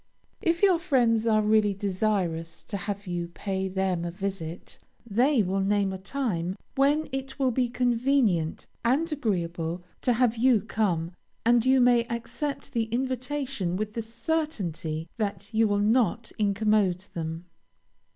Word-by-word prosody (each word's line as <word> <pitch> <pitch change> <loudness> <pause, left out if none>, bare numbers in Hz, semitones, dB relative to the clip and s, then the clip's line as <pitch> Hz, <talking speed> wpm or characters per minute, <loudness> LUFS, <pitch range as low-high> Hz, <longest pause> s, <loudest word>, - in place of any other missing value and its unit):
If 335 +2 +1
your 370 -4 +5
friends 240 -9 +2
are 215 -1 +4
really 210 -1 +3
desirous 185 -5 -1
to 205 - -6
have 200 +1 -4
you 175 -2 -3
pay 190 +2 -3
them 190 -2 -1
a 175 - -2
visit, 180 -2 -5 0.3
they 240 +3 +3
will 190 +1 -1
name 195 0 +1
a 190 - -6
time 190 -6 -2 0.2
when 290 +3 +2
it 265 0 -5
will 265 -2 +2
be 245 0 +1
convenient 240 - +1 0.2
and 285 +8 +2
agreeable 175 - -2 0.2
to 245 - +2
have 235 -1 +2
you 240 -2 +4
come, 180 -7 0 0.3
and 235 0 +5
you 260 +1 +4
may 245 -1 +5
accept 235 +5 -4
the 230 -1 +1
invitation 255 -4 -2
with 210 +2 -3
the 230 - -2
certainty 220 - -2
that 205 -1 -3
you 220 0 +4
will 205 -1 +1
not 220 +1 +2
incommode 205 -3 +2
them. 165 +1 -4
215 Hz, 145 wpm, -27 LUFS, 185-250 Hz, 0.3 s, your